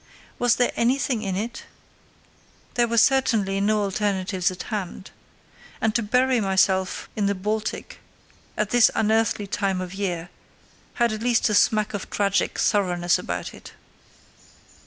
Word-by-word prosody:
Was 245 -1 +3
there 245 - +1
anything 245 -1 +1
in 195 -3 -3
it? 230 +4 -5 1.1
There 240 -1 +2
were 235 0 -1
certainly 220 -6 +3
no 210 +1 +2
alternatives 195 -2 -1
at 185 0 -7
hand. 195 -1 -5 0.7
And 220 -1 +1
to 235 - +1
bury 250 +3 +2
myself 190 -1 +1
in 205 -2 0
the 200 - 0
Baltic 210 +3 -4 0.6
at 210 -1 -1
this 240 -2 +6
unearthly 220 -1 +1
time 195 -1 -1
of 185 0 -5
year 180 -4 -3 0.7
had 235 -2 +2
at 215 - -5
least 235 -2 +2
a - - 0
smack 215 +1 +2
of 205 - -5
tragic 200 -1 0
thoroughness 175 -4 +1
about - - -5
it. - - -13
210 Hz, 140 wpm, -24 LUFS, 190-230 Hz, 1.1 s, this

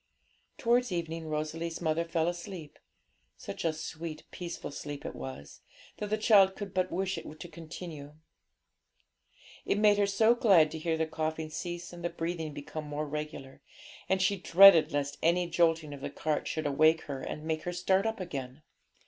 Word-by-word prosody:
Towards 240 0 +2
evening 165 -2 -3
Rosalie's 155 +2 -3
mother 165 0 0
fell 165 -1 0
asleep, 175 -2 -6 0.6
such - - -7
a 165 - +2
sweet, 155 0 -6
peaceful 175 -4 -6
sleep 145 0 -7
it - - -4
was, 65 +2 -8 0.4
that 210 - -4
the 215 - +1
child 200 -3 +5
could 200 -3 -7
but 185 0 0
wish 190 +1 -1
it 155 +1 -10
to 175 - -7
continue. 160 -3 -9 1.5
It - - 0
made 205 -1 +5
her 200 - +3
so 220 +4 +4
glad 195 -11 +5
to 160 - -5
hear 160 0 -1
the 160 - +1
coughing 160 0 -3
cease 175 +2 -5
and 175 -1 -9
the 175 - 0
breathing 165 -2 -3
become 150 +2 -7
more 150 +1 -3
regular, 145 -2 -6 0.5
and 190 - +2
she 200 +1 +2
dreaded 175 -1 +8
lest 145 0 -2
any 175 +2 +2
jolting 165 -3 +1
of 140 - -9
the - - -4
cart 155 -1 -2
should 155 -1 -3
awake 155 +3 +4
her 140 -3 -6
and 150 - -5
make 160 0 -2
her 175 - -3
start 190 +3 +1
up 220 -1 -3
again. 140 -5 -6
165 Hz, 175 wpm, -30 LUFS, 155-180 Hz, 1.5 s, dreaded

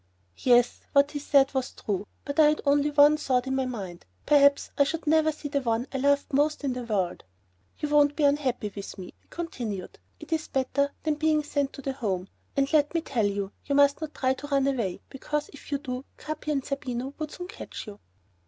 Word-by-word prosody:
Yes, 245 -1 +4
what 280 0 +5
he 290 - -3
said 275 -1 +3
was 260 -1 -2
true, 205 -1 -3 0.2
but 285 +1 -3
I 305 - +8
had 300 0 +2
only 285 +1 +3
one 295 +1 +6
thought 255 -4 0
in 265 0 -1
my 265 -1 0
mind, 195 -8 -6 0.2
perhaps 280 -1 +4
I 280 - +5
should 320 +4 -3
never 315 +1 +4
again 310 - -5
see 290 - -4
the 280 -1 0
one 230 -1 0
I - - 0
loved 285 +1 +2
most 300 +2 +2
in 270 -2 0
the 250 -1 -5
world. 195 -6 -1 0.5
"You 300 - -3
won't 290 -1 +4
be 305 - 0
unhappy 265 -7 +1
with 200 0 -7
me," 185 -2 -9
he - - -35
continued; 235 - -5 0.2
"it - - -5
is 315 -1 -1
better 275 +1 0
than 310 - +1
being 310 -1 +3
sent 285 -2 -1
to 275 - -9
the 270 - -2
Home. 195 -7 -3 0.3
And 275 +2 +1
let 295 +1 +3
me 330 - +2
tell 240 -9 0
you, 200 -1 -3 0.2
you 280 - +1
must 285 +2 +4
not 310 -1 -5
try 260 -1 +1
to 290 +2 -8
run 275 -2 +2
away, 235 -10 -1
because 295 +2 -3
if 285 - -13
you 285 - +2
do 255 -2 -5
Capi 310 0 -5
and 275 -3 -1
Zerbino 270 -1 -3
would 310 -1 -3
soon 355 +3 -7
catch - - -8
you." 210 -2 -10
280 Hz, 225 wpm, -27 LUFS, 250-295 Hz, 0.5 s, I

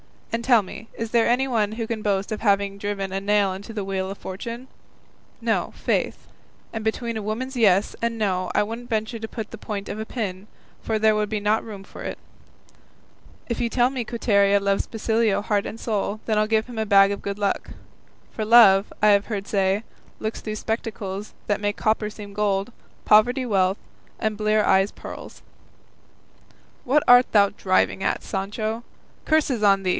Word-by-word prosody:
And 230 +1 -1
tell 240 -4 +6
me, 210 +3 -10
is 225 -1 -5
there 235 -1 +3
anyone 235 -4 +1
who 225 0 -3
can 220 -1 -4
boast 200 0 -1
of 215 - -2
having 200 -2 +1
driven 200 -1 -3
a 190 - -1
nail 205 -1 +2
into 200 +4 -8
the 210 -2 -3
wheel 190 -1 -2
of 195 - -6
fortune? 230 +7 -7 0.7
No, - - 0
faith; - - -1 0.5
and 220 -1 -5
between 230 +1 -2
a - - -3
woman's 235 +6 -4
'yes' 200 -3 +3
and 230 0 -1
'no' 185 -4 0
I 210 - +4
wouldn't 230 +3 -7
venture 220 +1 -2
to 220 - -5
put 220 -2 -6
the 230 - -7
point 200 -2 -5
of 210 - -5
a 220 - -3
pin, 205 -5 -4 0.3
for 220 - -1
there 215 0 +3
would 210 0 -1
not 215 +2 +2
be - - -12
room 200 -3 -8
for - - -12
it; - - -5 1.3
if 235 - -2
you 235 - +1
tell 245 +1 +3
me 255 -3 -3
Quiteria 200 -3 +3
loves 200 0 0
Basilio 220 -2 +1
heart 205 -1 0
and 225 - -7
soul, 215 -1 -2
then 215 -2 +1
I'll 215 - +2
give 220 0 +2
him 240 -3 -7
a 220 - 0
bag 200 -1 +6
of 200 - -4
good 200 0 -4
luck; 200 -1 -1 0.6
for 215 - -3
love, 210 -3 +7
I - - +7
have 200 -1 +4
heard 205 -3 -4
say, 195 +1 +1 0.4
looks 220 +1 -3
through 215 -1 -5
spectacles 215 -2 -4
that 205 -1 0
make 205 0 0
copper 215 -1 0
seem 205 -1 -10
gold, 200 +1 0 0.3
poverty 245 +5 +4
wealth, 190 -3 +2 0.4
and 215 -1 -2
bleary 215 0 +2
eyes 195 0 +3
pearls." - - -10 1.4
"What 285 +4 +3
art 245 0 +7
thou 200 -2 +6
driving 190 -1 +1
at, - - -1
Sancho? 215 +3 -3 0.4
curses 295 -7 +2
on 195 -2 +4
thee!" 185 - 0
215 Hz, 190 wpm, -24 LUFS, 200-225 Hz, 1.4 s, love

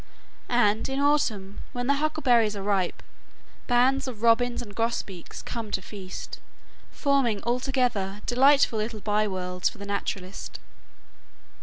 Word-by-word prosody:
And 225 -2 +2
in 270 +1 -1
autumn, 230 -9 +1
when 245 -1 -2
the 280 - +3
huckleberries 265 -8 +2
are 200 - -5
ripe, 195 -3 0 0.6
bands 255 +3 +3
of 230 -4 -7
robins 240 +1 +3
and 225 -5 -7
grosbeaks 215 -5 -3
come 230 -3 -5
to 195 - -1
feast, 190 -1 -8 0.5
forming 275 -7 +1
altogether 240 -5 0
delightful 265 -2 +4
little 215 +1 -3
byworlds 190 -3 0
for - - -14
the 200 - -8
naturalist. 195 -1 -4
230 Hz, 125 wpm, -26 LUFS, 200-255 Hz, 0.6 s, delightful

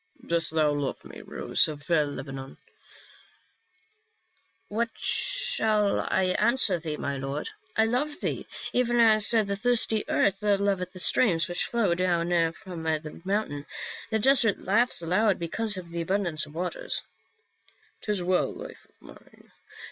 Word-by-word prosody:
" - - -19
Dost 170 -1 +2
thou 155 -2 +2
love 145 -2 -3
me, - - -10
rose - - +1
of 150 -2 -8
Lebanon 135 -4 -2 1.5
?" 365 -4 -40
"What 230 +3 -1
shall 485 - 0
I 185 -1 0
answer 215 -5 +4
thee, 155 -2 -4
my 140 -1 -3
lord? 135 - -4 0.3
I 220 - +5
love 265 +7 -1
thee - - -3 0.3
even 240 -1 +2
as 215 -2 +6
the 210 -4 +2
thirsty 220 -1 0
earth 195 0 +2
loveth 200 -3 +1
the 185 - -10
streams 175 -4 +3
which 175 -1 -1
flow 225 -7 +1
down 170 -2 +1
from 175 -1 -9
the 155 -1 -3
mountain; 185 -7 -2 0.4
the 220 - +1
desert 235 -2 +4
laughs 210 0 +2
aloud 190 +4 +2
because 210 +5 -3
of 175 -2 -8
the 170 0 -4
abundance 170 -4 -1
of 150 - -15
waters." 185 - 0 0.5
" - - -35
'Tis 205 -4 -1
well, 180 0 +1
life - - -10
of - - -34
mine. - - -17
190 Hz, 150 wpm, -27 LUFS, 165-225 Hz, 1.5 s, as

